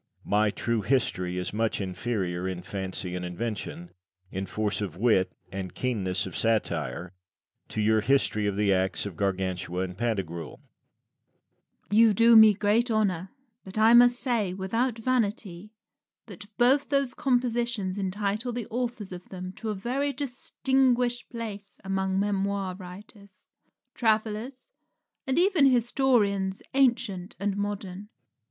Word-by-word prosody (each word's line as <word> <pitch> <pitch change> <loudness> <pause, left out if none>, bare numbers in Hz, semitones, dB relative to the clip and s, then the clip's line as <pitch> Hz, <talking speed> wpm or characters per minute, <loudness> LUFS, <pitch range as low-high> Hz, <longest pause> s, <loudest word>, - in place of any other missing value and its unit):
My 105 +1 +2
"True 115 +2 -1
History" 95 -7 0
is 90 +1 -3
much 110 +1 0
inferior, 95 -2 -2
in 90 -1 -4
fancy 95 -1 -4
and 90 - -4
invention, 115 - -5 0.4
in 95 0 -4
force 105 -1 -2
of 90 -5 -4
wit 95 -4 +3 0.2
and 95 -2 -6
keenness 100 -8 -1
of 95 - -7
satire, 85 - -1 0.6
to - - -4
your 110 +1 +3
"History 110 -3 +1
of 100 - -1
the 100 -1 +2
Acts 95 0 0
of 100 -4 -6
Gargantua 95 -1 -2
and 90 -1 -5
Pantagruel." 95 -8 -3
Rabelais. - - -39 0.6
You 225 -2 +6
do 230 +2 +6
me 220 -2 +9
great 215 +5 +2
honour; 195 -5 0 0.3
but 190 +2 -9
I 220 +2 +6
may 240 +1 +9
say, 240 -6 0
without 225 +6 -1
vanity, 215 -5 -1 0.5
that 205 - -9
both 270 +4 +4
those 275 -3 +1
compositions 240 -7 0
entitle 205 +5 -2
the 240 -2 -4
authors 235 -4 -3
of 180 0 -9
them 185 -1 -6
to 225 - -4
a 210 - -1
very 260 +8 -1
distinguished 255 -2 0
place 210 -4 -7
among 190 0 -1
memoir 200 -1 -1
writers, 190 +1 -13 0.4
travellers, 220 +3 -1 0.6
and 265 +2 0
even 350 -5 +5
historians, 230 -6 +2
ancient 235 -9 +1
and 200 0 -1
modern. 200 -1 -4
195 Hz, 135 wpm, -27 LUFS, -, 0.6 s, me